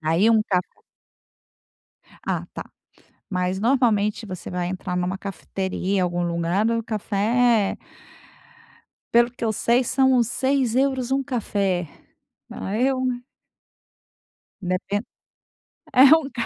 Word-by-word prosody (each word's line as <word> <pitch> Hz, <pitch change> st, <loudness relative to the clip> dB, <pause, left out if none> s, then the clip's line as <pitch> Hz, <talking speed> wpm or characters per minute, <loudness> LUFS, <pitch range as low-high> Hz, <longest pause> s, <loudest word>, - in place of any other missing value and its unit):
aí 165 Hz, +7 st, +3 dB
um 225 Hz, -1 st, +5 dB
ca 180 Hz, -2 st, +4 dB, 1.6 s
Ah, -, -, -2 dB
tá. -, -, -5 dB, 0.7 s
Mas 185 Hz, 0 st, -1 dB
normalmente 225 Hz, -4 st, +2 dB
você 185 Hz, -4 st, -7 dB
vai 180 Hz, -1 st, -2 dB
entrar 180 Hz, 0 st, -4 dB
numa 180 Hz, +2 st, -1 dB
cafeteria, 190 Hz, 0 st, -3 dB
algum 175 Hz, 0 st, -1 dB
lugar, 170 Hz, +5 st, 0 dB
o 230 Hz, 0 st, 0 dB
café 220 Hz, +1 st, +1 dB
é -, -, -35 dB, 1.3 s
pelo 235 Hz, +1 st, +5 dB
o -, -, -16 dB
que 245 Hz, 0 st, -6 dB
eu 220 Hz, -, +1 dB
sei 235 Hz, +4 st, +2 dB
são 265 Hz, +2 st, +3 dB
uns 240 Hz, -2 st, +3 dB
6€ 265 Hz, -1 st, +1 dB
um 275 Hz, +1 st, +1 dB
café, 200 Hz, -, -1 dB, 0.6 s
a 200 Hz, -, -4 dB
eu 260 Hz, +2 st, +1 dB, 1.7 s
Depen 195 Hz, +3 st, -1 dB, 0.9 s
é 255 Hz, -, +7 dB
um 295 Hz, -4 st, -5 dB
ca 235 Hz, -, -1 dB
215 Hz, 120 wpm, -23 LUFS, 185-245 Hz, 1.7 s, é